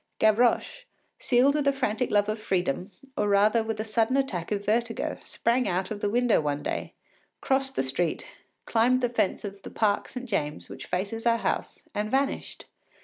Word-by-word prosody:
Gavroche, 240 - +2 0.3
seized 255 +3 +4
with 295 -1 0
a - - +6
frantic 250 -3 -1
love 205 0 +3
of 215 +1 -2
freedom, 185 -2 -1 0.2
or 210 - 0
rather 210 +3 +4
with 220 -1 -4
a - - 0
sudden 225 +3 +1
attack 195 -12 -1
of 205 -1 -1
vertigo, 230 +2 -1
sprang 245 +2 0
out 185 +4 -1
of 210 - -3
the 205 - +1
window 240 -2 +3
one 145 -1 -2
day, - - -4 0.4
crossed 270 0 0
the - - +1
street, 155 +5 -1 0.4
climbed 245 +3 +3
the 245 - +1
fence 225 -4 0
of 200 -1 -7
the - - -8
Parc 205 -2 +1
Saint 255 0 -7
James, 150 -9 -2
which - - -9
faces 210 +6 -2
our 230 0 +4
house, - - -3
and 210 +1 -2
vanished. 270 +3 -1
220 Hz, 185 wpm, -27 LUFS, 200-245 Hz, 0.4 s, a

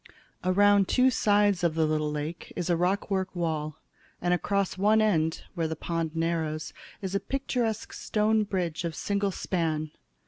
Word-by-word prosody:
Around 200 +1 +4
two 260 0 +4
sides 205 -4 +3
of 165 -2 +2
the 160 -1 +3
little 155 -1 0
lake 150 +3 -5
is 175 0 -1
a - - +4
rockwork 190 +2 0
wall, 155 -3 -2 0.4
and 175 0 +1
across 200 +1 0
one 210 +3 +4
end, 165 -7 +1
where 165 -3 -1
the 160 - -3
pond 165 0 -3
narrows, 160 -2 -1 0.3
is 190 0 -3
a 200 - +2
picturesque 245 -5 -2
stone 215 0 +1
bridge 180 -5 -2
of 165 -2 -3
single 200 +2 0
span. 160 -5 -2
180 Hz, 160 wpm, -28 LUFS, 160-205 Hz, 0.4 s, Around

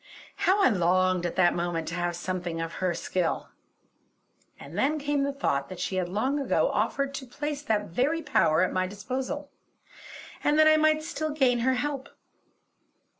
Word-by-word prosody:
How 395 +2 +3
I - - +6
longed 185 -2 +2
at - - -6
that 175 -2 +4
moment 170 -2 -2
to - - -6
have 175 -1 -1
something 175 -1 -3
of 165 0 -4
her 180 -2 +1
skill! 175 0 -2 1.1
And - - -10
then 300 +3 +1
came 290 -1 0
the 280 0 0
thought 140 - -1
that 185 - -8
she 185 +1 -2
had 180 -1 -1
long 255 +10 0
ago 275 - +1
offered 275 0 0
to 270 -1 -6
place 290 +3 -4
that 215 -7 0
very 290 - 0
power 160 - +3
at 185 - 0
my 185 0 0
disposal; 260 +8 -5 0.9
and 295 +1 +3
that 310 0 +6
I 310 - +7
might 310 0 +3
still 310 -1 -3
gain 265 -5 +2
her 260 +2 +2
help. 280 +1 -3
245 Hz, 175 wpm, -27 LUFS, 180-290 Hz, 1.1 s, I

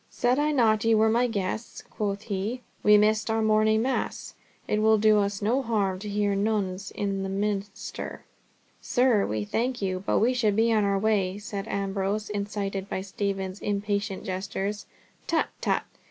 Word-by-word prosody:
"Said 250 +3 +1
I 300 +1 +2
not 220 -6 +3
ye 225 0 +4
were 220 +1 +4
my 240 +2 +3
guests?" 215 0 -4
quoth 200 -1 -3
he. 210 +5 -3 0.2
"We 210 0 +6
missed 215 +1 +2
our 220 0 +1
morning 215 0 +3
mass, 265 +1 -2 0.3
it 210 - +1
will 220 0 +5
do 215 0 +5
us 200 0 -1
no 240 +6 +2
harm 205 -6 0
to 210 +2 -6
hear 205 0 +1
Nones 200 -2 -1
in 195 -1 -2
the 195 - -3
Minster." 200 0 -4 0.6
"Sir, 245 -5 +2
we 105 -1 -2
thank 240 - -1
you, 185 -1 -2
but - - +1
we 240 +4 +3
should 220 -5 +1
be 225 +1 +3
on 215 -1 +3
our 200 0 +2
way," 200 -2 +1
said 205 -1 -5
Ambrose, 200 +1 -2
incited 200 -1 -3
by 190 - -2
Stephen's 195 0 -3
impatient 205 -1 -2
gestures. 195 +2 -3 0.4
"Tut, 330 - +1
tut. - - +1
205 Hz, 170 wpm, -27 LUFS, 195-220 Hz, 0.6 s, We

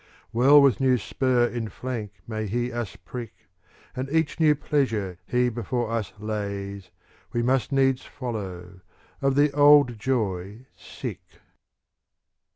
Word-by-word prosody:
Well 135 +5 +7
with 140 -2 +4
new 130 -2 +3
spur 125 +2 +1
in 120 -2 -3
flank 115 -6 -5
may 110 -1 -3
he 120 +4 -1
us 120 -4 -4
prick. 115 +5 -8 0.6
And 130 +1 -4
each 160 +2 0
new 155 -2 +5
pleasure 115 - -1
he 125 0 +2
before 120 0 -2
us 115 -3 -2
lays. 100 -2 -5 0.4
We 120 - 0
must 130 +2 +1
needs 135 -1 +2
follow, 95 -8 -6 0.4
of 135 -1 +2
the 145 +1 +4
old 145 -4 +5
joy 105 -2 -2
sick. - - -7
120 Hz, 130 wpm, -25 LUFS, 105-135 Hz, 0.6 s, Well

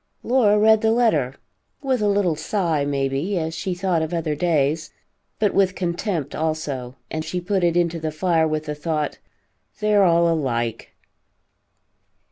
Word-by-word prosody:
Laura 235 -5 +3
read 220 0 +5
the 220 - +2
letter, 160 - +2 0.5
with 260 -4 0
a 210 - +2
little 200 -5 +2
sigh 165 -2 -1
may 140 -1 0
be, 150 +9 -2
as 160 -1 -2
she 175 +3 -3
thought 180 -2 0
of 160 +2 -2
other 160 -2 -1
days, 155 -1 0 0.5
but 210 -2 +1
with 190 -1 +2
contempt 175 - -2
also, 150 -6 -3 0.2
and 155 0 -3
she 180 +3 -3
put 190 +1 -1
it 170 0 +2
into 170 -1 +1
the 160 0 -2
fire 160 +1 +1
with 155 0 -2
the 150 - -3
thought, 150 0 -3 0.6
"They 210 0 +1
are 205 -1 +5
all 170 -1 +4
alike." 120 -8 -2
165 Hz, 165 wpm, -22 LUFS, 155-195 Hz, 0.6 s, read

